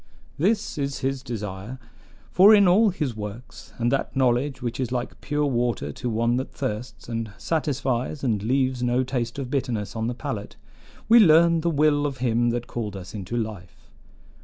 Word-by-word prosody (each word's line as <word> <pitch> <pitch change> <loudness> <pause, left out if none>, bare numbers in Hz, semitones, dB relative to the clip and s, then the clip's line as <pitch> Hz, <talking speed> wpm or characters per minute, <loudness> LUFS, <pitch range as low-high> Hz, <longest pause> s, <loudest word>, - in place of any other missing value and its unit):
This 200 -1 0
is 140 -2 -2
his 135 0 -1
desire; 105 0 -6 0.5
for 200 +4 +8
in 200 -2 +5
all 210 +5 +5
his 150 - -3
works, 105 +2 -8
and 120 0 0
that 140 - -1
knowledge 130 +1 +1
which 120 -1 -4
is 125 -2 -2
like 125 -1 -4
pure 150 +1 0
water 120 -3 -1
to 125 - -4
one 115 +2 +1
that 130 - -4
thirsts, 125 -2 -5
and 115 -2 -4
satisfies 140 -4 -2
and 110 -6 0
leaves 130 +2 0
no 125 +1 +1
taste 125 -2 -3
of 135 -2 -5
bitterness 125 -7 -2
on 110 0 -1
the 120 - -3
palate, 125 -7 -5 0.5
we 235 +2 +7
learn 170 -3 +6
the 170 - +1
will 150 -1 +2
of 140 -2 -5
him 120 -1 +1
that 120 0 -2
called 105 -4 -5
us 90 -1 -9
into 105 +3 -4
life. 105 -5 -6
125 Hz, 180 wpm, -24 LUFS, 115-145 Hz, 0.5 s, for